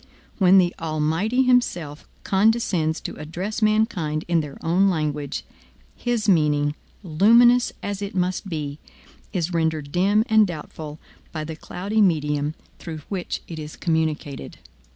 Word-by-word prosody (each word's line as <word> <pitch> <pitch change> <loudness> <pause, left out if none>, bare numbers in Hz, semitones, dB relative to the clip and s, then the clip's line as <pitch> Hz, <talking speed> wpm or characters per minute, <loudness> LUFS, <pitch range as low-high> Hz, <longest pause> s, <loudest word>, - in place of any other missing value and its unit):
When 190 0 +6
the 180 -2 +4
Almighty 165 +10 0
himself 180 - 0 0.2
condescends 190 -6 +2
to - - -6
address 180 +9 -5
mankind 215 -8 +1
in 170 -1 +2
their 150 -3 -5
own 185 +4 +3
language, 150 -4 -2 0.5
his 240 -3 -1
meaning, 150 -5 +3 0.3
luminous 235 +8 +5
as 205 0 -3
it 200 -1 -5
must 185 +2 -1
be, 150 -3 -4 0.5
is 180 -2 -2
rendered 160 -3 -1
dim 200 +5 +3
and 220 -3 +5
doubtful 155 -2 -7 0.3
by 155 -2 -4
the 160 +1 -6
cloudy 200 +7 -2
medium 150 -5 +1 0.2
through 160 -2 -7
which 190 -3 -3
it 165 -2 -7
is 150 0 -7
communicated. 160 -4 -2
170 Hz, 130 wpm, -23 LUFS, 155-205 Hz, 0.5 s, When